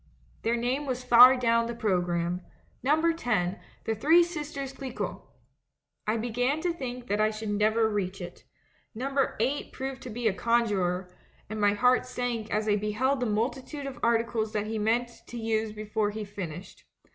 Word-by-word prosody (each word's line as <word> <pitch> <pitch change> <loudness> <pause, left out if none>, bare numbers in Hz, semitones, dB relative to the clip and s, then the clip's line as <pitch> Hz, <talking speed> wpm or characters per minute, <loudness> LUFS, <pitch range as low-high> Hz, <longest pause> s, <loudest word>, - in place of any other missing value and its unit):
"Their 230 +1 +1
name 255 +5 -1
was 255 -1 -2
far 250 +1 +9
down 230 -1 +2
the 235 - -4
programme: 175 -4 0 0.4
'Number 315 +5 +3
10: 215 - -1 0.2
The 225 - 0
Three 315 +10 +5
Sisters 295 -5 -5
Chcquot.' 265 -1 -5 0.9
I 215 +2 +2
be 230 +2 -3
gan 250 +6 +1
to 350 0 0
think 250 -5 -6
that 205 -2 -1
we 215 0 +3
should 215 -1 -4
never 215 +2 +3
reach 195 -2 -2
it. 175 -1 -9 0.5
Num 265 +4 -3
ber 275 -1 +1
8 265 +6 -1
proved 265 0 -5
to 255 - -7
be 235 +1 -1
a 210 - +2
conjurer, 190 -6 0 0.4
and 215 -1 -3
my 205 0 +4
heart 250 +4 +3
sank 245 -3 -3
as 215 +1 0
I 205 -1 +3
beheld 220 +7 0
the 250 - 0
multitude 260 +7 -2
of 270 -2 -6
articles 230 -1 +1
that 210 -1 -1
he 220 0 -3
meant 235 +3 0
to 240 - -7
use 220 -1 -1
before 215 0 -1
he 210 0 -5
finished. 185 -3 -8
230 Hz, 180 wpm, -28 LUFS, 210-255 Hz, 0.9 s, far